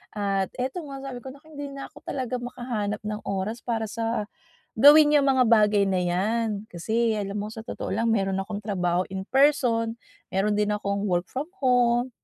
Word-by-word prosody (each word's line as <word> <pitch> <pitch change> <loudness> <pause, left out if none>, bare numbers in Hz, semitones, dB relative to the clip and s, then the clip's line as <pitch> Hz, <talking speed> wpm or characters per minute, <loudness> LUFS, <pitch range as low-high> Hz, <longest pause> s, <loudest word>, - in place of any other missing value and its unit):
At 195 -2 0
eto 260 +7 -3
nga 275 -1 -8
sabi 265 -2 -6
ko, 245 - -12
"Naku, 285 +2 -20
hindi 285 -1 -6
na 275 - -8
ako - - -18
talaga 255 -2 -2
makahanap 235 -4 -4
ng 210 0 -3
oras 200 +4 -2
para 230 -2 -2
sa", 230 -1 -1 0.5
gawin 295 +4 +7
yung 280 -2 +4
mga 260 -2 +4
bagay 210 -3 +4
na 190 -1 +1
yan. 205 +6 0 0.2
Kasi 220 +5 0
alam 205 -1 -3
mo 205 - -3
sa 220 +1 -8
totoo - - -6
lang 230 +1 +1
meron 195 -3 +1
akong 200 +1 -5
trabaho 180 -4 0
in 190 0 -4
person, 250 -5 +3 0.4
meron 205 +2 +2
din 210 0 +2
akong 200 0 -2
work 175 0 +1
from 270 +3 -3 0.2
home, 245 -1 +3
225 Hz, 185 wpm, -25 LUFS, 200-250 Hz, 0.5 s, gawin